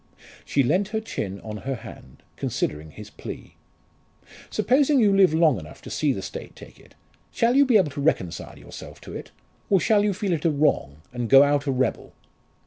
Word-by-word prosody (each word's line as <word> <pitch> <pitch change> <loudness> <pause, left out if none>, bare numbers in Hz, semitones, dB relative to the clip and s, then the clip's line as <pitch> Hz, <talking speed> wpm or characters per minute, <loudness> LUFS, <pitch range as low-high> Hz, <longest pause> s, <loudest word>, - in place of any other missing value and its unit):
She 140 - +1
leant 180 +10 +1
her 220 +2 -2
chin 100 - -5
on 110 -1 -7
her 135 +5 -4
hand, 90 - -13
considering 75 +1 -3
his - - -11
plea. - - -9 1.0
"Supposing 280 +2 +3
you 205 -4 +4
live 190 -4 +5
long 160 - +3
enough 75 -2 -12
to - - -9
see 150 -2 +1
the 95 -7 -4
State - - -8
take - - -14
it, - - -20 0.4
shall 235 +2 +2
you 280 0 +5
be 240 -4 +6
able 175 -8 +2
to 140 +1 -5
reconcile 95 - -1
yourself - - -11
to - - -10
it? - - -7 0.4
Or 195 - +4
shall 205 +2 +3
you 205 -2 +1
feel 190 -1 -1
it 155 - -2
a 165 - +3
wrong, 140 - 0
and 120 -2 -3
go 135 +1 +8
out 145 0 +1
a - - +2
rebel?" 130 -2 -1
150 Hz, 200 wpm, -24 LUFS, 120-205 Hz, 1.0 s, go